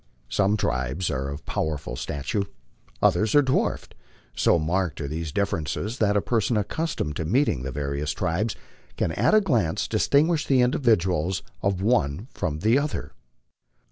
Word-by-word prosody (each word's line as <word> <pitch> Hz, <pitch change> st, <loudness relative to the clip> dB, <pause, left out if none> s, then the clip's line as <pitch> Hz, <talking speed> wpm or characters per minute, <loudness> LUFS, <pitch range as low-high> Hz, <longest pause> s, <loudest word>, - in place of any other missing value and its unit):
Some 100 Hz, -, +2 dB
tribes 65 Hz, +2 st, -1 dB
are 70 Hz, +1 st, -2 dB
of 70 Hz, +2 st, -7 dB
powerful 75 Hz, -6 st, -3 dB
stature, 75 Hz, +11 st, -2 dB, 0.6 s
others 110 Hz, +3 st, +3 dB
are 145 Hz, -, +7 dB
dwarfed. 130 Hz, 0 st, 0 dB, 0.4 s
So -, -, +4 dB
marked 85 Hz, +1 st, -1 dB
are 70 Hz, -, -3 dB
these 80 Hz, +1 st, -4 dB
differences 100 Hz, -, -2 dB
that 105 Hz, -1 st, +3 dB
a 100 Hz, -, +1 dB
person 115 Hz, -1 st, +1 dB
accustomed 105 Hz, -, -2 dB
to -, -, -2 dB
meeting 90 Hz, -, +1 dB
the 65 Hz, +1 st, -4 dB
various 70 Hz, +2 st, -2 dB
tribes 95 Hz, +5 st, -1 dB, 0.4 s
can 80 Hz, -, 0 dB
at 215 Hz, -, +3 dB
a 215 Hz, -, +6 dB
glance 120 Hz, -, +1 dB
distinguish 150 Hz, +2 st, +2 dB
the 130 Hz, -2 st, +4 dB
individuals 95 Hz, -, +2 dB, 0.2 s
of 95 Hz, -1 st, 0 dB
one 105 Hz, -, +1 dB
from 80 Hz, -5 st, -3 dB
the 115 Hz, +7 st, +4 dB
other. 145 Hz, +1 st, -4 dB
95 Hz, 150 wpm, -25 LUFS, 75-115 Hz, 0.6 s, are